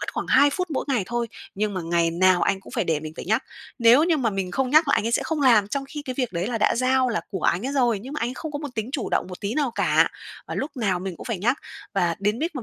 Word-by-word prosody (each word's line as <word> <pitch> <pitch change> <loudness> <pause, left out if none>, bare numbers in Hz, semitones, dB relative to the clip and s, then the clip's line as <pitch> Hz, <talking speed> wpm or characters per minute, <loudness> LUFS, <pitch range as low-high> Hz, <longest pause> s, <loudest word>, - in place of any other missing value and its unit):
mất - - -4
khoảng - - -3
2 280 +2 +5
phút 360 +3 -3
mỗi 285 - -1
ngày 255 -6 +1
thôi, 240 0 -2 0.3
nhưng 205 0 -1
mà 185 - -2
ngày 170 0 +1
nào 180 +1 +3
anh 195 - +1
cũng - - -14
phải 230 -5 0
để 160 -3 0
mình 155 0 -7
phải - - -6
nhắc. 220 +7 +1 0.4
Nếu 240 +6 +6
như 335 -2 +2
mà 245 -6 0
mình 195 -2 -3
không 260 +6 -1
nhắc 310 +1 +5
là - - +4
anh 220 - 0
ấy 230 - -1
sẽ - - +2
không 320 -2 -2
làm 230 -7 +5
trong 275 +5 -2
khi 295 0 -6
cái 255 -3 -5
việc 250 -6 -1
đấy 175 +1 -2
là 235 0 -2
đã - - +3
giao 255 +1 +2
là 225 - -1
của 190 - -4
anh 185 +9 +1
ấy 275 - -2
rồi, 240 -6 +2
nhưng 255 +8 -9
mà 300 - -4
anh 235 - 0
ấy 250 - -6
không 315 +1 -6
có 290 - -3
một 290 -1 -5
tính 220 0 -3
chủ 285 - -2
động - - +1
một 180 - -9
tí 205 +3 -3
nào 285 -3 +1
cả, - - +3 0.4
mà - - -4
lúc 285 +1 -4
nào 200 -7 0
mình 185 -2 -5
cũng - - -10
phải 230 -5 -3
nhắc. 240 +9 +1 0.4
Và 170 -1 +1
đến 210 +3 0
mít 330 +3 -2
mà 260 - -4
235 Hz, 325 wpm, -24 LUFS, 195-275 Hz, 0.4 s, Nếu